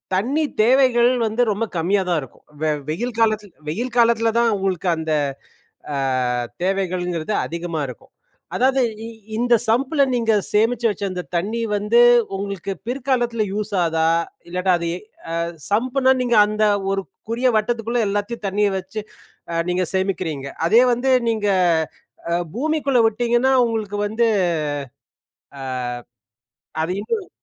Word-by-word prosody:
தண்ணி 260 +11 +1 0.2
தேவைகள் 245 0 +4 0.2
வந்து 220 +3 0
ரொம்ப 210 +3 -1
கம்மியா 185 +4 +1
தான் 170 - +2
இருக்கும். 130 - -13 0.2
வெ 155 -1 +2 0.2
வெயில் 230 +9 -3
காலத்தில் 215 -3 +1
வெயில் 235 +10 -3
காலத்தில 230 -1 +4
தான் 235 -1 +3
உங்களுக்கு 190 -2 -2
அந்த 160 0 -3 0.8
அ - - -1 0.7
தேவைகள்ங்கிறது 180 -2 -1
அதிகமா 170 -2 -4
இருக்கும். 125 - -11 0.4
அதாவது 265 +1 +3 0.2
இ - - -6 0.3
இந்த 240 0 +2 0.2
சம்ப்பில 270 +6 +2
நீங்க 230 -2 +2 0.2
சேமிச்சு 230 +3 +2
வச்ச 205 -1 -4
அந்த 180 -1 -3
தண்ணி 210 +7 -1
வந்து 210 +3 +2 0.4
உங்களுக்கு 195 -1 -4
பிற்காலத்தில 245 -3 0
யூஸ் 210 0 -3
ஆகுதா, 160 -1 +1 0.4
இல்லாட்டா 180 +1 +1
அது 170 - -3
ஏ 180 - -6 0.3
அ - - -3 0.4
சம்புன்னா 255 +4 +2
நீங்க 240 -1 +1
அந்த 215 +1 -1 0.3
ஒரு 195 0 0 0.3
குரிய 240 +3 +1
வட்டத்துக்குள்ள 235 +2 -1
எல்லாத்தையும் 205 +2 -3
தண்ணியை 205 +1 +1
வச்சு 190 +3 -5 0.5
அ - - -3 0.2
நீங்க 180 +1 +1
சேமிக்கிறீங்க. 180 -7 -2 0.2
அதே 230 +7 +6
வந்து 260 +3 0 0.2
நீங்க 215 -2 0 0.8
அ - - +2 0.2
பூமிக்குள்ள 280 -1 +1
விட்டீங்கன்னா 240 +4 +2
உங்களுக்கு 215 -3 -3
வந்து 225 +3 +1 2.5
அ - - +1
அது 165 +3 -1
இன்னும் 405 - -3
215 Hz, 130 wpm, -21 LUFS, 190-240 Hz, 2.5 s, அதே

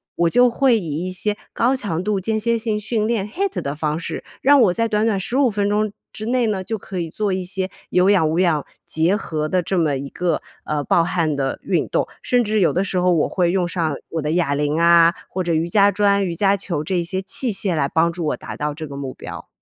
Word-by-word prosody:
我 170 0 +2
就 245 +5 +5
会 250 0 +3
以 165 -1 -4
一 - - -4
些 205 +3 +1 0.2
高 250 +3 +2
强 200 -10 -2
度 205 0 0
间 220 +3 -1
歇 230 +2 +1
性 220 -2 -1
训 215 0 -1
练 220 -4 -1
HIIT 385 - -2
的 140 +1 -4
方 150 0 -1
式， 175 - -5 0.2
让 280 0 +6
我 195 -6 +4
在 230 +4 0
短 215 -1 +1
短 215 -4 +1
15 255 +7 +1
分 205 0 0
钟 210 0 +1 0.2
之 215 - -7
内 245 -1 +1
呢， 200 -3 -1
就 220 +3 -3
可 190 -2 -6
以 165 -1 -3
做 205 +3 -1
一 185 0 -2
些 190 +1 -2 0.2
有 180 +2 +3
氧 185 -6 +4
无 160 +2 0
氧 165 -6 +2 0.2
结 165 +5 +1
合 155 -7 -3
的 185 +2 +1
这 185 +2 -2
么 155 -5 +1
一 140 +1 -5
个， 180 +3 -1 0.2
呃， 150 -1 -1
爆 170 - +3
汗 165 -3 0
的 135 -1 -2
运 - - 0
动， - - 0
甚 245 -1 +2
至 215 0 +1
有 175 - +4
的 185 - +1
时 185 - -2
候 180 0 +3
我 165 -3 +2
会 175 -2 +1
用 180 -1 +1
上 165 -4 -1 0.2
我 165 - -2
的 150 +1 -2
哑 165 -5 +1
铃 150 +2 0
啊， 170 0 +6 0.2
或 185 0 -2
者 170 - 0
瑜 160 +1 +1
伽 200 +2 +4
砖、 200 0 +2
瑜 175 - -2
伽 200 +3 +3
球 175 -6 -3
这 185 +4 -2
一 175 - +1
些 185 +3 -2
器 225 +5 -1
械 190 -3 0
来 140 -3 0
帮 165 +1 +2
助 170 -1 -4
我 - - -1
达 - - -8
到 150 0 -2
这 155 +1 -7
个 140 - -8
目 135 -2 -5
标。 - - -9
185 Hz, 280 characters per minute, -21 LUFS, 165-210 Hz, 0.2 s, 让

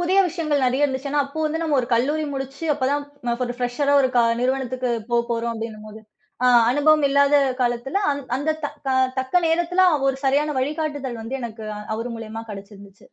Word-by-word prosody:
புதிய 365 +2 +2
விஷயங்கள் 305 -5 -1
நெறைய 260 +4 +2
இருந்துச்சு. 270 0 -2
ஏன்னா, 290 0 +2
அப்போ 280 +3 -9
வந்து 315 +2 -2
நம்ம 305 -3 +1
ஒரு 240 - -4
கல்லூரி 290 +7 +1
முடிச்சு 270 +4 -6
அப்பத் 270 -1 -1
தான் 285 -4 -4
ஒரு 245 - -4
ஃபிரெஷ்ஷரா 250 +4 0
ஒரு 260 - +3
க 240 - +6 0.2
நிறுவனத்துக்குப் 250 -3 -1
போ 240 - +3
போறோம் 235 0 -1
அப்டின்னும்போது. 215 -1 -7 0.4
அ - - +5 0.2
அனுபவம் 295 +2 +4
இல்லாத 280 +1 +3 0.3
காலத்துல 245 +8 0 0.4
அந்தத் 310 +3 -2
த - - 0 0.2
க - - 0 0.3
தக்க 260 +4 -4
நேரத்துல 345 +3 +2 0.2
ஒரு 270 - +1
சரியான 290 +2 +2
வழிகாட்டுதல் 290 -4 -3
வந்து 230 +4 -5
எனக்கு 225 -1 -7 0.3
அவரு 235 +2 -4
மூலியமா 225 0 -7
கடைச்சுருந்துச்சு. 200 -1 -11
265 Hz, 175 wpm, -22 LUFS, 235-290 Hz, 0.4 s, க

